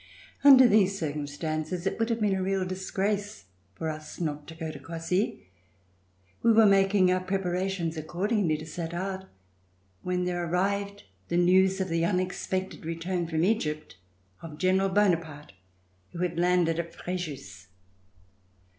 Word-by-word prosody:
Under 265 -3 +9
these 200 -3 +3
circumstances, 155 +2 -3
it 195 - -1
would 225 +1 +1
have 230 0 0
been 205 -2 +2
a 190 - -1
real 190 0 0
disgrace 195 - -3 0.3
for 160 - -4
us 155 -1 -6
not 150 -3 -3
to 165 - -9
go 160 -1 -5
to 150 - -9
Cossey. 165 - -2 1.0
We 230 - +4
were 220 0 +6
making 195 -2 +4
our 185 - +2
preparations 185 -2 -2
accordingly 175 +1 0
to 155 - -8
set 165 +1 -5
out, 190 +1 -4 0.8
when 180 +4 -1
there 175 -1 -1
arrived 200 +4 -1 0.2
the 170 - 0
news 190 +2 +4
of 190 -1 -1
the 165 0 0
unexpected 185 +1 -2
return 165 +2 -3
from 160 -1 -1
Egyj)t 155 -6 0 0.5
of 155 -2 -9
General 190 +2 +2
Bonaparte 165 - 0 0.6
who 170 - -7
had 170 -1 -2
landed 175 -2 +2
at 170 0 -5
Frejus. 140 - -6
180 Hz, 145 wpm, -28 LUFS, 165-195 Hz, 1.0 s, Under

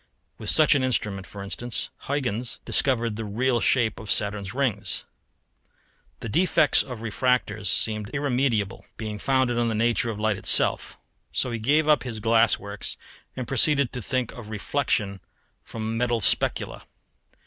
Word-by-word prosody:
With - - -2
such 155 -1 +6
an 140 - +2
instrument, 105 -6 -1
for 100 -1 -9
instance, 120 +4 -4 0.2
Huyghens 125 -4 -2
discovered 120 -5 +2
the 115 - -4
real 120 +4 0
shape 120 -2 +1
of 110 - -10
Saturn's 100 -2 +1
ring. 130 -4 -1 1.4
The - - -5
defects 160 - +3
of 125 -4 -7
refractors 110 -2 0
seemed 110 +2 0
irremediable, 125 -7 -1
being 105 -2 -5
founded 130 0 +1
in 120 0 +1
the 110 - -1
nature 115 +1 +1
of 105 -2 -5
light 110 -2 0
itself. - - +3 0.3
So 125 - -1
he 115 - -3
gave 150 +7 +2
up 150 -1 +4
his 115 -4 -6
"glass 115 +1 +3
works"; 100 -1 -6 0.4
and 125 -2 -5
proceeded 140 0 +2
to 125 - -4
think 130 +2 -2
of 115 -3 -10
reflexion 110 -3 -1 0.4
from 110 0 -5
metal 120 -1 +1
specula. 100 - +1
115 Hz, 150 wpm, -25 LUFS, 105-130 Hz, 1.4 s, such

